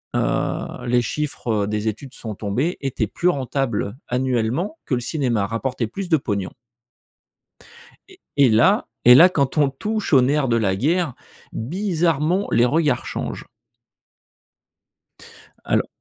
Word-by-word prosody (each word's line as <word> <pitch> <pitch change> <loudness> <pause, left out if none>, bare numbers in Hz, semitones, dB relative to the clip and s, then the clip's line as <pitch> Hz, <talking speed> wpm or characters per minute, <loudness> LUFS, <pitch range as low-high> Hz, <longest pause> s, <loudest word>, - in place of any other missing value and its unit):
heu, - - -2
les 120 0 +3
chiffres 115 -6 -2
des 105 +1 -2
études 125 +5 -5
sont 110 -2 -6
tombées, 120 - -2
étaient 125 -5 -2
plus 175 - 0
rentables 130 - -2
annuellement 130 - -1
que 130 - 0
le 120 - -2
cinéma, 120 -6 -1
rapportait 115 +2 -2
plus 185 - -6
de 160 - +4
pognon 100 -8 -3 1.6
et - - -18 0.2
et 140 -3 +6
là 185 - +3 0.2
et 125 +1 +9
là 170 +7 +8
quand 140 -4 -1
on 145 -2 +4
touche 215 +7 -3
au 135 - +7
nerf 140 +2 +1
de 115 -1 +2
la 100 -4 +1
guerre 155 - 0 0.4
bizarrement 170 - 0
les 120 - +4
regards 145 -1 +1
changent. - - -5 2.2
Alors - - +1
130 Hz, 135 wpm, -21 LUFS, 115-160 Hz, 2.2 s, et